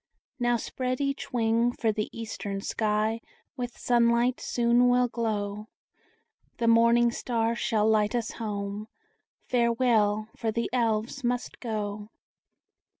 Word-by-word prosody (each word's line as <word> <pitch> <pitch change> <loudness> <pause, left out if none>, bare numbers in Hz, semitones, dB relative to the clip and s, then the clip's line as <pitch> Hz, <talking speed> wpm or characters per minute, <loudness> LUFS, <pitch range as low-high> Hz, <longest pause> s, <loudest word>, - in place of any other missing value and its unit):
Now 240 0 +2
spread 255 +2 -3
each 275 -1 -2
wing, 230 0 +2
for 225 -2 0
the 210 0 -3
eastern 215 -3 -5
sky 215 +2 0 0.3
With 245 -2 -5
sunlight 240 +1 +2
soon 240 +1 +3
will 250 0 +4
glow. 215 -3 -3 0.9
The 230 - 0
morning 235 +1 +5
star 230 -1 -1
shall 220 -3 +1
light 215 0 +2
us 230 -2 -1
home: 205 -1 -4 0.6
Farewell! 230 -3 +2
for 225 -2 -2
the 235 +1 -2
Elves 230 +2 0
must 245 0 -2
go. 210 -2 -4
230 Hz, 120 wpm, -27 LUFS, 215-240 Hz, 0.9 s, morning